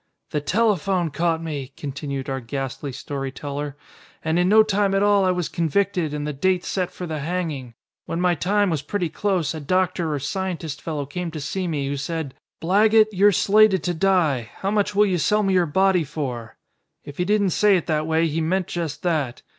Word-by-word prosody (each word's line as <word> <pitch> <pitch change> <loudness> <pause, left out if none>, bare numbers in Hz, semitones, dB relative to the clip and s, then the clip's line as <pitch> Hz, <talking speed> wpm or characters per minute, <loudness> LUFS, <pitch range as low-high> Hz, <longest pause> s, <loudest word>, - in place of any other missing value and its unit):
"The 150 - -1
telephone 190 -2 +1
caught 165 +2 0
me," 140 -4 -5
continued 140 -1 -5
our 135 0 -2
ghastly 135 +2 -5
story 135 +1 -5
teller, 145 +1 -5 0.5
"and 160 +2 +1
in 180 +1 +3
no 220 +1 +7
time 200 -2 +1
at 195 - +2
all 205 -1 +4
I - - +3
was 180 -2 0
convicted 175 -1 0
and 150 0 -3
the 150 - -3
date 180 +6 0
set 185 -2 -1
for 180 - -7
the 160 -2 -4
hanging. 150 -7 -3 0.3
When 165 - -2
my 180 0 +3
time 195 +4 +1
was 155 -4 -1
pretty 175 +3 -2
close 180 -3 -1
a 160 - -5
doctor 180 +1 0
or 150 - -1
scientist 160 0 -4
fellow 150 -3 -3
came 170 +5 -4
to 160 -1 -6
see 175 +6 -3
me 145 -4 -2
who 140 +1 -2
said, 150 -1 -4 0.3
'Blaggett, 215 +5 +4
you're 205 +1 +5
slated 200 -1 +4
to 175 - 0
die. 160 - +1
How 195 - -2
much 205 -1 0
will 210 +1 +5
you 185 -3 0
sell 210 +7 +2
me 195 -1 +1
your 180 -2 +3
body 190 +2 +3
for?' 130 -7 -5 0.5
If 145 +2 -11
he - - +3
didn't 205 -1 +2
say 205 +2 +4
it 175 - -3
that 155 -1 0
way 160 +1 +2
he 165 0 -1
meant 180 +3 0
just 165 -4 -4
that. 155 -8 -1
170 Hz, 205 wpm, -23 LUFS, 145-190 Hz, 0.5 s, no